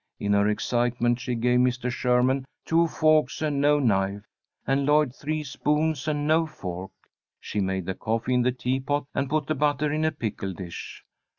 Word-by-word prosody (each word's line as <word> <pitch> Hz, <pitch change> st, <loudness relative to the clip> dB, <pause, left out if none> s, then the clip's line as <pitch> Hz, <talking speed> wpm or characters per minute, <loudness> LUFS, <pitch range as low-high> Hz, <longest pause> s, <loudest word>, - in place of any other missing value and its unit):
In 100 Hz, 0 st, 0 dB
her 100 Hz, 0 st, +3 dB
excitement 120 Hz, +2 st, +1 dB
she 125 Hz, 0 st, -3 dB
gave 125 Hz, +2 st, +2 dB
Mr. 125 Hz, 0 st, +1 dB
Sherman 125 Hz, +2 st, +2 dB, 0.2 s
two 165 Hz, +1 st, +3 dB
forks 155 Hz, -4 st, +2 dB
and 150 Hz, -3 st, 0 dB
no 145 Hz, +1 st, +4 dB
knife, 100 Hz, -6 st, +1 dB, 0.4 s
and 135 Hz, +2 st, +1 dB
Lloyd 150 Hz, -2 st, +3 dB
three 155 Hz, +1 st, -3 dB
spoons 150 Hz, +1 st, -1 dB
and 145 Hz, -1 st, 0 dB
no 160 Hz, +2 st, +3 dB
fork. 95 Hz, -, -6 dB, 0.5 s
She 105 Hz, -, -4 dB
made 95 Hz, -2 st, -1 dB
the 95 Hz, -, -2 dB
coffee 115 Hz, +5 st, -2 dB
in 125 Hz, -, +3 dB
the 125 Hz, +1 st, +2 dB
teapot, 130 Hz, +3 st, -1 dB
and 135 Hz, -, -1 dB
put 155 Hz, 0 st, 0 dB
the 155 Hz, -, 0 dB
butter 150 Hz, 0 st, +1 dB
in 155 Hz, +1 st, 0 dB
a 155 Hz, -, +2 dB
pickle 100 Hz, -6 st, -4 dB
dish. 90 Hz, -2 st, -8 dB
130 Hz, 180 wpm, -26 LUFS, 115-150 Hz, 0.5 s, no